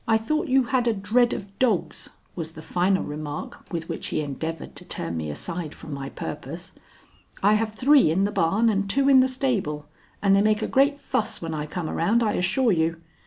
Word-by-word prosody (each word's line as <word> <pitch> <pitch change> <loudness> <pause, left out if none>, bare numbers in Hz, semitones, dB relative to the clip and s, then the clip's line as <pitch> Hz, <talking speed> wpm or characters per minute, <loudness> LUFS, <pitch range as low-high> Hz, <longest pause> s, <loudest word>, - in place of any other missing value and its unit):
"I 220 - +4
thought 305 +8 -1
you 265 0 +4
had 245 0 0
a 230 - +2
dread 230 +5 +2
of 195 0 -6
dogs," 230 -8 0 0.3
was 165 -2 -5
the 155 - -10
final 185 +4 +1
remark 150 0 -6
with 165 -2 -4
which 165 - -4
he - - -1
endeavored 155 +2 -5
to - - -9
turn 85 0 -4
me 80 -2 -3
aside 165 - -5
from 150 - -9
my 135 -1 -5
purpose. - - -7 0.7
"I 205 +2 +5
have 215 0 0
three 270 - +5
in 180 +5 +2
the 205 - +1
barn 205 +5 +2
and 200 -1 -1
two 275 +6 +2
in 270 -1 +7
the 255 - +5
stable, 225 - -1 0.3
and 195 -1 +4
they 195 - +4
make 215 +1 +2
a - - 0
great 280 +2 +3
fuss 225 -6 -2
when 165 -1 -5
I 150 -1 -3
come 170 +1 -4
around, 215 +11 +1
I 210 -2 +1
assure 220 +7 +2
you." 165 -1 +1
195 Hz, 215 wpm, -25 LUFS, 160-235 Hz, 0.7 s, in